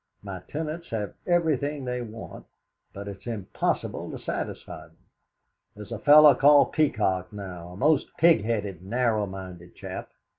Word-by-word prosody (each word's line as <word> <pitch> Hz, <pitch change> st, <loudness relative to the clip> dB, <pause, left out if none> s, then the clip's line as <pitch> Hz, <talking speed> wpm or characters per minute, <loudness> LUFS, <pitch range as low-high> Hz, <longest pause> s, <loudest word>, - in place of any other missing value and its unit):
My 95 Hz, -2 st, -6 dB
tenants 160 Hz, +2 st, -5 dB
have 105 Hz, -3 st, -3 dB
everything 150 Hz, -5 st, +1 dB
they 125 Hz, 0 st, -2 dB
want, 115 Hz, -1 st, -9 dB, 0.4 s
but 100 Hz, +1 st, -8 dB
it's 100 Hz, +3 st, -9 dB
impossible 105 Hz, -5 st, -2 dB
to -, -, -6 dB
satisfy -, -, -6 dB
them. -, -, -27 dB, 0.8 s
There's 105 Hz, -1 st, -10 dB
a -, -, -4 dB
fellow 150 Hz, 0 st, +8 dB
called 145 Hz, 0 st, +5 dB
Peacock, 100 Hz, -11 st, +1 dB
now, 90 Hz, -4 st, -8 dB
a -, -, -11 dB
most 150 Hz, +5 st, +3 dB
pig 165 Hz, -10 st, +5 dB
headed, 105 Hz, -6 st, -2 dB
narrowminded 95 Hz, -5 st, -2 dB
chap. -, -, -7 dB
110 Hz, 140 wpm, -26 LUFS, 95-145 Hz, 0.8 s, fellow